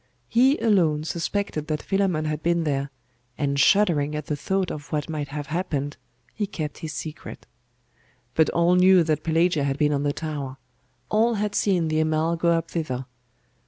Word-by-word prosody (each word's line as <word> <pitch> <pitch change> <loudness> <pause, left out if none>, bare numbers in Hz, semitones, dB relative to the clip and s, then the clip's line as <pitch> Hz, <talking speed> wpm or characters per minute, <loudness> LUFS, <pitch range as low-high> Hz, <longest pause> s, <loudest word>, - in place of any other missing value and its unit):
He 260 - +4
alone 170 -9 +2
suspected 165 -1 -2
that 155 -1 -2
Philammon 190 -6 0
had 155 0 -2
been 170 0 +1
there; 140 -2 -1 0.5
and 140 -2 0
shuddering 155 -6 +3
at 150 -1 -4
the 150 - -2
thought 190 +5 -1
of 150 +1 -8
what 150 -2 -1
might 150 -2 -3
have 145 +1 -5
happened, 145 -3 -2 0.4
he 210 -2 -2
kept 155 -6 -5
his 160 - -5
secret. 155 +2 -7 0.9
But 160 +3 +3
all 170 +1 +3
knew 180 0 +6
that 155 -2 0
Pelagia 165 -1 +2
had 140 -1 -1
been 150 0 +2
on 140 - 0
the 145 0 +1
tower; 145 -4 -5 0.5
all 225 +2 +2
had 210 0 -1
seen 185 -6 +1
the 155 0 0
Amal 155 +1 +1
go 170 +1 +1
up 165 -1 0
thither. 135 -6 -3
155 Hz, 175 wpm, -24 LUFS, 150-180 Hz, 0.9 s, knew